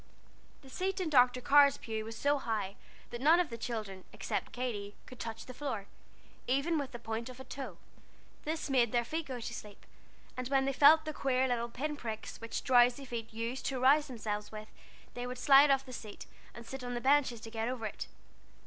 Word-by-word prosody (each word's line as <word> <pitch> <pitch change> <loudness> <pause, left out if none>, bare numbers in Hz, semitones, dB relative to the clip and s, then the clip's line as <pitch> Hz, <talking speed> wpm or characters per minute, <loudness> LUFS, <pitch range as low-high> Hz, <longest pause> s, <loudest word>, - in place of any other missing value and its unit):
The 265 - -13
seat 380 +4 -2
in 345 -4 -2
Dr. 250 -2 +5
Carr's 280 +1 +6
pew 220 -1 -4
was 225 0 -7
so 285 +3 +2
high 210 -5 -2 0.4
that 240 - -6
none 320 +5 +6
of 350 -7 0
the - - -4
children, 215 -5 -5
except - - -3
Katy, 210 -5 -4
could 255 - -12
touch 225 -1 -6
the 255 - -9
floor, 255 -7 -4 0.6
even 280 +6 +1
with 275 -3 -4
the 240 - -6
point 225 +1 -4
of 255 0 -11
a - - -7
toe. 260 -10 -7 0.7
This 310 +1 -2
made 250 -5 +3
their 240 -1 +1
feet 320 +5 -3
go 255 -2 -5
to 230 - -5
sleep; 210 -1 -10 0.5
and 255 -1 -4
when 270 0 +2
they 275 - 0
felt 310 +4 +7
the 310 - -3
queer 265 -2 +1
little 240 -1 -1
pin 295 +6 -3
pricks 225 -6 -6
which 230 - -4
drowsy 245 +1 +4
feet 235 -3 -5
use 230 +3 -3
to 265 -2 -2
rouse 290 +4 +5
themselves 215 -5 -4
with, 215 0 -8 0.4
they 245 0 -4
would 250 0 -5
slide 275 +3 +7
off 270 0 +3
the 255 - -10
seat, 215 -3 -8 0.3
and 235 - -9
sit 265 +2 -7
on 245 0 -4
the - - -1
benches 265 -2 +3
to 225 - -9
get 225 0 -2
over 245 -3 -3
it. 210 - -5
250 Hz, 210 wpm, -32 LUFS, 225-275 Hz, 0.7 s, felt